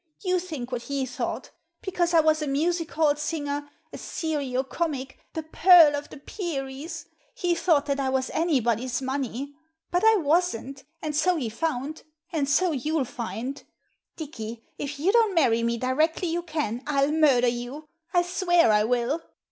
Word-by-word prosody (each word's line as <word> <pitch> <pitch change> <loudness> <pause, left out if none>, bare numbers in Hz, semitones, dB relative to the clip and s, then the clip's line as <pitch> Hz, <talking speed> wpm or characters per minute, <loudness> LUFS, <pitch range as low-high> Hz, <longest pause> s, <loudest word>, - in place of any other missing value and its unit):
You 365 -1 +2
think 305 -9 -6
what 245 -1 -2
he 275 +1 -2
thought. 250 -1 -4 0.3
Because 350 -2 0
I 325 - +7
was 310 0 +2
a 300 - -2
music 325 +4 0
hall 305 -2 +3
singer 290 -1 -3
— - - -41
a - - -7
serio 285 -6 -2
comic 270 -2 -3
— - - -43
the 320 - -2
Pearl 320 -1 +7
of 290 0 -5
the - - -10
Peris 280 -2 -5 0.2
— - - -38
^he 350 -2 +1
thought 315 -4 +2
that 280 -1 -1
I 270 -1 0
was 260 0 -1
anybody's 250 -7 +1
money. 270 +1 -3 0.4
But 355 +3 +1
I 445 0 +7
wasn't, 290 - 0 0.2
and 305 -1 -2
so 360 +4 +3
he 260 -8 -2
found 290 +4 -3 0.2
— 310 - -42
and 285 -4 0
so 355 +5 +3
you'll 300 +1 -1
find! 250 +3 -5 0.5
Dicky, 235 -7 -7 0.2
if 285 0 -4
you 355 +7 +3
don't 445 -4 +3
marry 240 -8 +3
me 235 0 0
directly 310 +8 +1
you 340 +1 -1
can, 300 -9 -3
I'll 280 -1 +2
murder 285 -6 +4
you 245 +6 -4
— 330 +1 -45
I 350 -1 +3
swear 350 - +3
I 210 0 +4
will!" 245 +7 0
290 Hz, 180 wpm, -26 LUFS, 260-330 Hz, 0.5 s, I